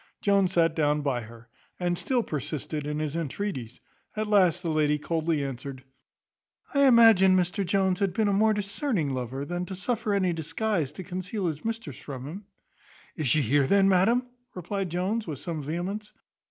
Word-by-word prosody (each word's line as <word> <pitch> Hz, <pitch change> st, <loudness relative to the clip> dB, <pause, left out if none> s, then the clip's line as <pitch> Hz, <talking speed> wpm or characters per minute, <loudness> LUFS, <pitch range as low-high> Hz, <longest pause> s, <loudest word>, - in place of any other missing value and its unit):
Jones 195 Hz, -2 st, +2 dB
sat 165 Hz, -2 st, +3 dB
down 150 Hz, -1 st, +2 dB
by 135 Hz, -4 st, -1 dB
her, 115 Hz, +1 st, -13 dB, 0.3 s
and 175 Hz, -1 st, 0 dB
still 245 Hz, +6 st, 0 dB
persisted 150 Hz, -, -4 dB
in 150 Hz, 0 st, -2 dB
his 155 Hz, 0 st, -3 dB
entreaties; 155 Hz, -, -4 dB, 0.4 s
at 215 Hz, 0 st, -1 dB
last 185 Hz, -4 st, +3 dB
the 165 Hz, -, -1 dB
lady 150 Hz, -1 st, +2 dB
coldly 160 Hz, -1 st, -1 dB
answered, 135 Hz, 0 st, -6 dB, 0.9 s
"I 280 Hz, -1 st, +5 dB
imagined 225 Hz, -6 st, +7 dB
Mr 180 Hz, +3 st, 0 dB
Jones 190 Hz, 0 st, +1 dB
had 200 Hz, -2 st, +1 dB
been 215 Hz, +3 st, +1 dB
a 200 Hz, -, +2 dB
more 215 Hz, +2 st, +4 dB
discerning 205 Hz, -, -1 dB
lover, 130 Hz, +2 st, -4 dB
than 175 Hz, +2 st, -3 dB
to 190 Hz, -, -5 dB
suffer 210 Hz, +1 st, -1 dB
any 185 Hz, -3 st, +1 dB
disguise 165 Hz, 0 st, -1 dB
to 185 Hz, -, -7 dB
conceal 185 Hz, +3 st, -4 dB
his 155 Hz, -3 st, -3 dB
mistress 225 Hz, -, -4 dB
from 130 Hz, -3 st, -7 dB
him." 190 Hz, +8 st, -8 dB, 0.7 s
"Is 155 Hz, -5 st, -2 dB
she 145 Hz, +5 st, +3 dB
here, 135 Hz, +3 st, +2 dB
then, 195 Hz, +2 st, +4 dB
madam?" 220 Hz, +7 st, +3 dB, 0.3 s
replied 185 Hz, +1 st, -3 dB
Jones, 190 Hz, +6 st, -1 dB
with 150 Hz, -4 st, -4 dB
some 160 Hz, +2 st, -5 dB
vehemence. 180 Hz, +8 st, -4 dB
175 Hz, 175 wpm, -27 LUFS, 150-200 Hz, 0.9 s, imagined